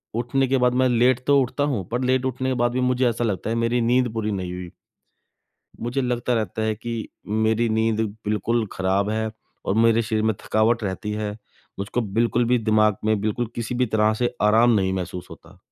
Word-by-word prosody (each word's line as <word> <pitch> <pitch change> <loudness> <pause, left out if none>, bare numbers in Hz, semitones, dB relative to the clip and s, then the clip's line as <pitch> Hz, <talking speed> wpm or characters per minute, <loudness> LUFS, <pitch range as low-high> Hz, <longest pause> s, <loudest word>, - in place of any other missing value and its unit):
उठने 125 +3 0
के 135 +1 +2
बाद 125 -1 +2
मैं 130 0 +3
लेट 125 +1 +3
तो 140 -1 +5
उठता 130 +3 -1
हूँ 125 -11 -1
पर 120 +2 -1
लेट 130 0 +1
उठने 130 0 -2
के - - +1
बाद 120 - +2
भी 125 - -1
मुझे 125 0 +2
ऐसा 120 +1 -2
लगता 105 -1 -2
है 115 - 0
मेरी 115 +1 +1
नींद 125 +2 +2
पूरी 110 -1 -2
नहीं 90 -2 -3
हुई। 90 -1 -7 1.1
मुझे 120 +4 -2
लगता 125 -1 -1
रहता 110 -1 -2
है 110 0 0
कि 115 +1 -5 0.4
मेरी 110 +1 +2
नींद 110 0 +1 0.2
बिल्कुल 110 +2 0
ख़राब 95 +2 0
है 110 0 -1 0.4
और 95 - +1
मेरे 115 0 +4
शरीर 110 -1 -1
में 110 0 +2
थकावट 110 +2 +2
रहती 100 +2 -3
है, 105 -1 -2 0.5
मुझको 100 +5 -2
बिल्कुल 115 +3 +1
भी 125 +1 +2
दिमाग 110 -2 +3
में 110 -1 +2
बिल्कुल 110 +3 -1
किसी 115 +1 -3
भी 125 0 +1
तरह 110 0 +2
से 120 +2 -1
आराम 110 +3 +5
नहीं 95 -2 +1
महसूस 90 -1 -4
होता। 85 +3 -14
115 Hz, 205 wpm, -23 LUFS, 105-125 Hz, 1.1 s, तो